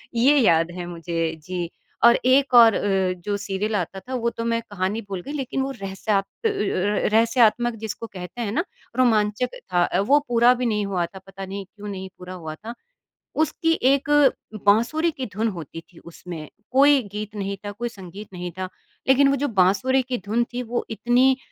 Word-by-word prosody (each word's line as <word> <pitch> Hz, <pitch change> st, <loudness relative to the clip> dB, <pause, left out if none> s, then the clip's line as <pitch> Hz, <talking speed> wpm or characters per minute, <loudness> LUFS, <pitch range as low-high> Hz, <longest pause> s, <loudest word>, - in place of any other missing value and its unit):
ये 275 Hz, +5 st, +5 dB
याद 170 Hz, -8 st, +4 dB
है 175 Hz, 0 st, -6 dB
मुझे, 165 Hz, -1 st, -3 dB
जी 175 Hz, -1 st, -4 dB, 0.4 s
और 235 Hz, 0 st, +8 dB
एक 265 Hz, +1 st, +4 dB
और 230 Hz, -3 st, +9 dB
अ, 190 Hz, -2 st, +1 dB
जो 205 Hz, -1 st, 0 dB
सीरियल 200 Hz, +2 st, -2 dB
आता 190 Hz, 0 st, -2 dB
था 255 Hz, +7 st, -9 dB
वो 235 Hz, -1 st, 0 dB
तो 230 Hz, -, -6 dB
मैं 230 Hz, 0 st, 0 dB
कहानी 200 Hz, +3 st, -1 dB
भूल 190 Hz, -2 st, -4 dB
गई, 285 Hz, -, -8 dB
लेकिन 270 Hz, -2 st, -2 dB
वो 270 Hz, +1 st, -2 dB
रहस्यात 195 Hz, -2 st, -2 dB, 0.2 s
अ -, -, +6 dB
अ, -, -, 0 dB, 0.6 s
रहस्यात्मक 230 Hz, +1 st, +3 dB
जिसको 220 Hz, +1 st, -5 dB
कहते 185 Hz, +4 st, -8 dB
हैं 210 Hz, -3 st, -2 dB
ना, 335 Hz, +10 st, 0 dB, 0.3 s
रोमांचक 225 Hz, -1 st, +2 dB, 0.2 s
था। 175 Hz, 0 st, +3 dB, 0.2 s
वो 290 Hz, +2 st, +6 dB
पूरा 240 Hz, +1 st, +5 dB
भी 250 Hz, 0 st, -2 dB
नहीं 210 Hz, -3 st, 0 dB
हुआ 185 Hz, -3 st, -1 dB
था, 190 Hz, +3 st, -11 dB
पता 195 Hz, 0 st, -8 dB
नहीं 195 Hz, +1 st, -6 dB
क्यों 210 Hz, +2 st, -11 dB
नहीं 190 Hz, -1 st, -6 dB
पूरा 180 Hz, 0 st, -8 dB
हुआ 160 Hz, -4 st, -7 dB
था। 225 Hz, +7 st, -8 dB, 0.7 s
उसकी 325 Hz, +1 st, +1 dB, 0.2 s
एक 280 Hz, +1 st, 0 dB, 0.6 s
बाँसुरी 240 Hz, +11 st, +3 dB
की 265 Hz, -4 st, -5 dB
धुन 220 Hz, +4 st, 0 dB
होती 165 Hz, -3 st, -7 dB
थी -, -, -15 dB
उसमें 170 Hz, -2 st, -9 dB, 0.2 s
कोई 280 Hz, +1 st, +5 dB
गीत 210 Hz, +1 st, -6 dB
नहीं 200 Hz, -1 st, -3 dB
था, 205 Hz, -, -3 dB
कोई 240 Hz, +3 st, -4 dB
संगीत 195 Hz, -1 st, -10 dB
नहीं 180 Hz, -1 st, -5 dB
था, 185 Hz, -, -3 dB, 0.4 s
लेकिन 270 Hz, +1 st, +5 dB
वो 275 Hz, -, +3 dB
जो -, -, +2 dB
बाँसुरी 255 Hz, +9 st, +3 dB
की 250 Hz, 0 st, -3 dB
धुन 230 Hz, +4 st, +1 dB
थी, 250 Hz, +1 st, -2 dB
वो 240 Hz, +1 st, -3 dB
इतनी 250 Hz, +4 st, +3 dB
210 Hz, 190 wpm, -23 LUFS, 185-245 Hz, 0.7 s, और